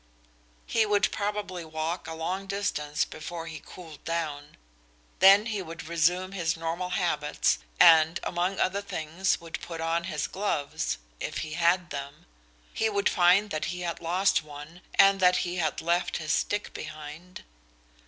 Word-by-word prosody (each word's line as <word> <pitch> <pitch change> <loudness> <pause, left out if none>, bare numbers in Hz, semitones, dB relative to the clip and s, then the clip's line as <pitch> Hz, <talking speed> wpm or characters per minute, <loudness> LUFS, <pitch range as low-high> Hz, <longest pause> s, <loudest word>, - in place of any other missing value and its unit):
He 225 - +2
would 205 -1 +2
probably 205 -4 -3
walk 160 +2 -4
a 160 - -5
long 180 +4 -3
distance 150 -7 -1
before 165 +2 -7
he 155 -3 -8
cooled 160 -5 -12
down. 155 -4 -4 0.6
Then 195 +3 +8
he 215 -4 -2
would 165 -2 -8
resume 175 +3 +1
his 165 -4 -1
normal 165 +2 -3
habits 150 -5 +1 0.2
and 165 -1 +7
among 180 +2 -1
other 200 +2 +1
things 170 -1 -1
would 165 -1 -7
put 165 -2 -7
on 165 +1 0
his 155 -5 -2
gloves 150 - -2 0.2
if - - -4
he 155 - -7
had 170 +1 +2
them. 140 0 -7 0.5
He 220 - +1
would 200 -1 +1
find 190 +3 +4
that 155 - -1
he 180 0 -4
had 170 -1 -4
lost 180 +4 +2
one 150 +3 -11
and 195 0 +6
that 180 -1 +5
he 180 +1 -3
had 165 - -1
left 170 +2 0
his 155 -1 -3
stick 205 +7 -1
behind. 155 +3 -9
170 Hz, 155 wpm, -28 LUFS, 155-185 Hz, 0.6 s, Then